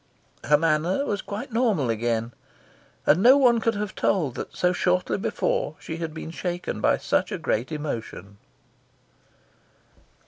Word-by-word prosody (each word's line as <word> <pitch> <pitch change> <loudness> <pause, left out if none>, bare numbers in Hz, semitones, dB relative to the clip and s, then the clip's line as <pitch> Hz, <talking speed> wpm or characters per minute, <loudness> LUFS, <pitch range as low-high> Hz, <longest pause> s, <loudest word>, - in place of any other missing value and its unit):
Her 150 - +5
manner 165 - +1
was 205 -5 -2
quite 210 +3 -6
normal 215 - +2
again, 115 +1 -1 0.7
and 165 - +4
no 255 +5 +7
one 245 -4 +4
could 230 0 0
have 205 -1 -3
told 160 -10 0
that 120 - -7
so 180 0 +2
shortly 180 0 +1
before - - -1
she 160 - -6
had 165 -1 -4
been 160 +1 -7
shaken 175 +1 -4
by - - +3
such - - 0
a - - -2
great 120 +8 -1
emotion. 115 -9 -6
175 Hz, 145 wpm, -25 LUFS, 145-210 Hz, 0.7 s, no